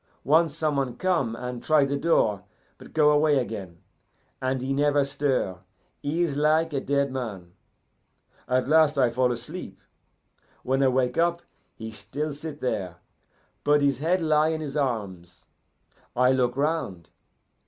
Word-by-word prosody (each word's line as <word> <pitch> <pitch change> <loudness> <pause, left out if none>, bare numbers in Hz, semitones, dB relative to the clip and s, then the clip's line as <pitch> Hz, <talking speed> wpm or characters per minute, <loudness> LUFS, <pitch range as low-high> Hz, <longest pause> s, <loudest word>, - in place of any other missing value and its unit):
Once 160 +1 +3
some 155 -3 0
one 135 -3 -2
come 165 -12 0
and 125 0 -6
try 155 -3 +3
the 140 +1 -1
door, 125 - +1 0.4
but - - -13
go 150 -1 +4
away 150 0 +3
again, 105 -9 -4 0.6
and 130 0 -1
he 135 +1 -1
never 145 0 +2
stir; 135 -10 -1 0.4
he 160 +5 0
is 155 -5 -1
like 155 +2 +2
a 135 - -1
dead 140 0 0
man. 105 -9 -6 1.0
At 125 0 +1
last 155 -1 +4
I 125 -3 +3
fall 125 +1 +1
asleep. 120 - -7 0.8
When 135 +1 0
I 135 - +4
wake 125 0 +1
up, 170 0 +1 0.3
he 110 0 -7
still 125 +9 -5
sit 150 0 -8
there, 95 -8 -2 0.7
but 145 0 +3
his 140 -3 +2
head 175 +5 +1
lie 155 -1 +3
in 160 0 -2
his 145 -2 -6
arms. 100 - -3 0.7
I 125 +1 +4
look 125 -1 +1
round. 140 - -2
140 Hz, 155 wpm, -26 LUFS, 120-155 Hz, 1.0 s, go